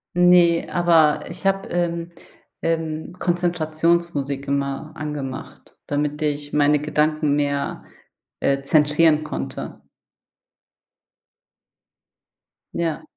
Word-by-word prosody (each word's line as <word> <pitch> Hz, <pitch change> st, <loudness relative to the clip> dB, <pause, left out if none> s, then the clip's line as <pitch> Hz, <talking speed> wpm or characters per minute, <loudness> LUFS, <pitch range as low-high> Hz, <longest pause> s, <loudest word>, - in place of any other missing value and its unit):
Ne, 175 Hz, -1 st, +5 dB
aber 165 Hz, -4 st, +3 dB
ich 180 Hz, +3 st, -10 dB
habe, 195 Hz, 0 st, +1 dB
ähm 170 Hz, -1 st, -2 dB, 0.5 s
ähm, 160 Hz, -1 st, -2 dB
Konzentrationsmusik 165 Hz, -5 st, 0 dB
immer 140 Hz, +2 st, -2 dB
angemacht, 145 Hz, -4 st, -7 dB
damit 145 Hz, +1 st, -2 dB
ich 145 Hz, -1 st, -2 dB
meine 150 Hz, 0 st, +4 dB
Gedanken 150 Hz, 0 st, +1 dB
mehr, 140 Hz, -1 st, -2 dB, 0.5 s
äh, 140 Hz, 0 st, +1 dB
zentrieren 150 Hz, +2 st, +3 dB
konnte. -, -, -6 dB, 2.9 s
Ja. 165 Hz, -3 st, -2 dB
155 Hz, 80 wpm, -22 LUFS, 145-170 Hz, 2.9 s, Ne